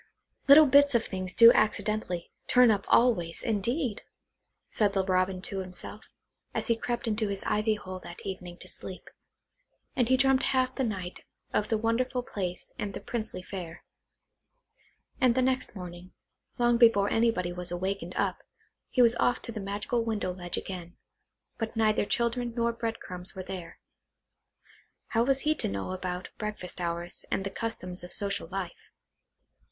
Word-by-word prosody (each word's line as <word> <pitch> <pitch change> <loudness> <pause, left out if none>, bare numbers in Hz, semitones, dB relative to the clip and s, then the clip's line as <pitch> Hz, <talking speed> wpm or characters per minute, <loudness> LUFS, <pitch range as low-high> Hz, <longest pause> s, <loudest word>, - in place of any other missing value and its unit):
"Little 295 +3 +10
bits 285 -1 +5
of 230 - +3
things 185 -1 -3
do 230 +4 +9
accidentally, 210 -4 0 0.2
turn 250 -2 +6
up 200 -2 0
always, 195 -9 +3
indeed!" 230 +3 0 0.7
said 205 -2 +1
the 195 -1 +1
Robin 185 0 +1
to 200 -4 -4
himself, 185 +3 -8 0.5
as - - 0
he 230 - +3
crept 240 +1 -3
into 215 0 +1
his 200 -1 -3
ivy 215 +1 +1
hole 185 -3 -7
that 175 -1 -11
evening 180 -2 -6
to - - -11
sleep; 185 - -6 0.8
and 245 -2 +2
he 260 - +5
dreamt 270 0 +4 0.2
half 255 0 +2
the 265 - -1
night 185 -6 -4 0.3
of 210 - +1
the 220 - +2
wonderful 245 +3 0
place 180 -6 -5
and 200 -1 -3
the - - -4
princely 220 -6 -4
fare. 175 -4 -7 1.4
And 250 -2 +4
next 255 -3 0
morning, 180 -1 -9 0.4
long 240 -1 +3
before 205 -4 +5
anybody 225 -6 +1
was 180 0 -3
awake 190 +3 -2
and 175 +2 -8
up, - - 0 0.5
he 250 - +4
was 235 0 +6
off 245 - +2
to - - -5
the 220 - -5
magical 210 +4 -1
window 215 -5 -2
ledge 175 -1 -5
again, 175 -2 -6 0.6
but 225 0 -3
neither 215 -2 +2
children 235 +1 -1
nor 235 -1 +1
bread 230 -1 -3
crumbs 180 +1 -6
were 190 - -5
there. 180 -2 -7 1.3
(How 230 0 +2
was 270 +1 +2
he 305 - +2
to - - -1
know 100 - -3
about 185 -1 -4
breakfast 210 -4 -4
hours, 170 0 -3
and 195 - 0
the 195 - -4
customs 185 -6 -4
of 175 - -9
social 200 -3 -2
life?) 185 -1 -6
205 Hz, 165 wpm, -29 LUFS, 185-235 Hz, 1.4 s, Little